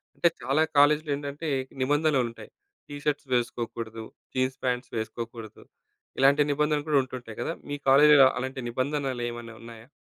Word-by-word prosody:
అంటే 170 Hz, -, +3 dB
చాలా 140 Hz, +4 st, +2 dB
కాలేజ్‌లో 150 Hz, +2 st, +4 dB
ఏంటంటే, 145 Hz, +2 st, -5 dB, 0.3 s
నిబంధనలు 145 Hz, 0 st, +2 dB
ఉంటాయి. 115 Hz, -, -13 dB, 0.4 s
టీ 145 Hz, -, -7 dB
షర్ట్స్ 145 Hz, -1 st, -1 dB
వేసుకోకూడదు, 115 Hz, -2 st, -3 dB, 0.3 s
జీన్స్ 130 Hz, 0 st, 0 dB
పాంట్స్ 125 Hz, 0 st, -2 dB
వేసుకోకూడదు. 115 Hz, 0 st, -6 dB, 0.6 s
ఇలాంటి 140 Hz, +2 st, +5 dB
నిబంధనలు 150 Hz, +1 st, 0 dB
కూడా 150 Hz, -, +4 dB
ఉంటుంటాయి 125 Hz, -4 st, -9 dB
కదా! 120 Hz, -, -2 dB, 0.2 s
మీ 145 Hz, -, -2 dB
కాలేజ్‌లో 145 Hz, 0 st, +8 dB
అలాంటి 130 Hz, +1 st, -4 dB
నిబంధనలేమన్నా 120 Hz, -3 st, -3 dB
ఉన్నాయా? 115 Hz, 0 st, -12 dB
130 Hz, 130 wpm, -27 LUFS, 120-145 Hz, 0.6 s, కాలేజ్‌లో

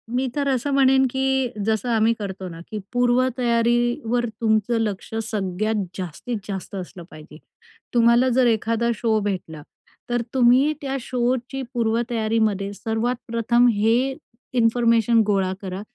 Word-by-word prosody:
मी 260 Hz, +1 st, +1 dB
तर 285 Hz, -1 st, 0 dB
असं 270 Hz, +1 st, 0 dB
म्हणेन 265 Hz, -1 st, +4 dB
की 265 Hz, 0 st, 0 dB, 0.2 s
जसं 220 Hz, +2 st, 0 dB
आम्ही 225 Hz, 0 st, +3 dB
करतो 190 Hz, -2 st, -5 dB
ना 165 Hz, -1 st, -10 dB
की 215 Hz, -, -4 dB, 0.2 s
पूर्वतयारीवर 240 Hz, 0 st, +1 dB, 0.2 s
तुमचं 220 Hz, +1 st, +2 dB
लक्ष 210 Hz, -2 st, -3 dB, 0.2 s
सगळ्यात 210 Hz, +1 st, -1 dB
जास्तीत 190 Hz, +6 st, -5 dB
जास्त 195 Hz, -1 st, -6 dB
असलं 180 Hz, -1 st, -7 dB
पाहिजे. 155 Hz, 0 st, -13 dB, 0.6 s
तुम्हाला 235 Hz, +2 st, +4 dB
जर 250 Hz, 0 st, +3 dB
एखादा 230 Hz, +1 st, +1 dB
शो 220 Hz, -1 st, +1 dB
भेटला 180 Hz, -6 st, -4 dB, 0.5 s
तर 240 Hz, 0 st, 0 dB
तुम्ही 260 Hz, +3 st, +4 dB
त्या 275 Hz, -1 st, -3 dB
शोची 250 Hz, +2 st, -2 dB
पूर्वतयारीमध्ये 225 Hz, -3 st, 0 dB
सर्वात 225 Hz, +4 st, -2 dB
प्रथम 235 Hz, +1 st, +2 dB
हे 230 Hz, +6 st, +1 dB, 0.4 s
इन्फॉर्मेशन 230 Hz, 0 st, +3 dB
गोळा 195 Hz, -2 st, +1 dB
करा 190 Hz, -1 st, -5 dB
230 Hz, 130 wpm, -22 LUFS, 215-245 Hz, 0.6 s, म्हणेन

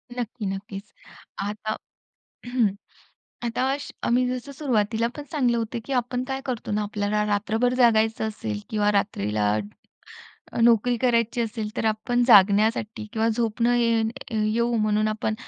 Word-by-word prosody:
नक्की. 240 Hz, -2 st, -4 dB
नक्कीच. 195 Hz, +1 st, -6 dB, 0.5 s
आता 210 Hz, +1 st, -3 dB, 0.7 s
हं. 245 Hz, -4 st, +2 dB, 0.8 s
आता 235 Hz, +2 st, -1 dB, 0.4 s
आम्ही 250 Hz, +2 st, +3 dB
जसं 255 Hz, +2 st, -4 dB
सुरुवातीला 230 Hz, -5 st, 0 dB
पण 295 Hz, -, -5 dB
सांगितलं 250 Hz, -6 st, +1 dB
होतं, 230 Hz, +1 st, -3 dB
की 275 Hz, -, -3 dB
आपण 250 Hz, 0 st, -1 dB
काय 265 Hz, 0 st, -2 dB
करतो 245 Hz, -5 st, -4 dB
ना 210 Hz, 0 st, 0 dB
आपल्याला 210 Hz, 0 st, -1 dB
रात्रभर 220 Hz, +4 st, +1 dB
जागायचं 225 Hz, -3 st, +3 dB
असेल 110 Hz, -, -4 dB
किंवा 210 Hz, -1 st, +2 dB
रात्रीला 105 Hz, -, 0 dB, 1.0 s
अ, -, -, -3 dB
नोकरी 235 Hz, +1 st, +4 dB
करायची 235 Hz, 0 st, +1 dB
असेल 220 Hz, -1 st, -3 dB
तर -, -, -1 dB
आपण 220 Hz, +3 st, +1 dB
जागण्यासाठी 210 Hz, 0 st, +4 dB
किंवा 225 Hz, -1 st, +1 dB
झोप 225 Hz, 0 st, -1 dB
न -, -, +4 dB
ये 230 Hz, -1 st, +2 dB, 0.5 s
येऊ 235 Hz, +1 st, +1 dB
म्हणून 215 Hz, 0 st, +2 dB
आपण 215 Hz, +1 st, -1 dB
225 Hz, 140 wpm, -25 LUFS, 210-240 Hz, 1.0 s, नोकरी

